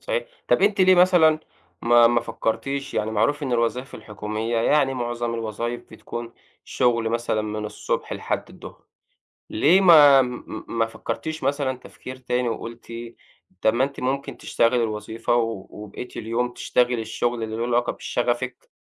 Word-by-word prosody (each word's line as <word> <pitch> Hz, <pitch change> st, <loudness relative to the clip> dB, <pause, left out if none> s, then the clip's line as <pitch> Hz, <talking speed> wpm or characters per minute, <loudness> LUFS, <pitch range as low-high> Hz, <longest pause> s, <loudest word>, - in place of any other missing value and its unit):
صحيح -, -, -3 dB, 0.2 s
طَب -, -, +3 dB
أنتِ 200 Hz, -1 st, +3 dB
ليه 185 Hz, 0 st, +7 dB
مثلًا، 175 Hz, -4 st, +5 dB, 0.4 s
ما 120 Hz, 0 st, +6 dB
ما 120 Hz, 0 st, +3 dB
فكرتيش 135 Hz, +5 st, -3 dB
يعني 105 Hz, +1 st, -1 dB
معروف 115 Hz, +8 st, +1 dB
إن 130 Hz, -3 st, -2 dB
الوظايف 120 Hz, +2 st, -1 dB
الحكومية 110 Hz, +2 st, -4 dB
يعني 135 Hz, +3 st, +2 dB
معظم 120 Hz, -1 st, -3 dB
الوظايف 115 Hz, +1 st, -3 dB
بتكون 120 Hz, 0 st, -7 dB, 0.3 s
شُغل 115 Hz, -2 st, +1 dB
مثلًا 115 Hz, -1 st, -1 dB
من 105 Hz, 0 st, -4 dB
الصبح 105 Hz, -, -3 dB
لحد -, -, -3 dB
الضُّهر، -, -, -13 dB, 0.7 s
ليه 190 Hz, +3 st, +4 dB
ما 150 Hz, -6 st, +8 dB
م 125 Hz, -1 st, -4 dB
م -, -, -7 dB
ما 115 Hz, -1 st, 0 dB
فكرتيش 155 Hz, +7 st, -5 dB
مثلًا 135 Hz, -1 st, 0 dB
تفكير 130 Hz, 0 st, -10 dB
تاني 125 Hz, -1 st, -1 dB
وقُلتِ 115 Hz, +1 st, -7 dB, 0.7 s
طَب 110 Hz, -, +3 dB
ما 120 Hz, +3 st, +2 dB
أنتِ 140 Hz, +1 st, -3 dB
ممكن 135 Hz, +2 st, -2 dB
تشتغلي 115 Hz, +1 st, +1 dB
الوظيفة 110 Hz, +1 st, -2 dB
و 115 Hz, -5 st, -1 dB
وبقيَّة 105 Hz, +3 st, -8 dB
اليوم 120 Hz, +2 st, -2 dB
تشتغلي 125 Hz, -1 st, +1 dB
الشُّغل 120 Hz, +1 st, -2 dB
اللي 110 Hz, 0 st, -4 dB
له 115 Hz, -, -2 dB
علاقة 120 Hz, 0 st, +1 dB
بشغفِك، 120 Hz, +1 st, -3 dB
120 Hz, 155 wpm, -23 LUFS, 115-135 Hz, 0.7 s, ما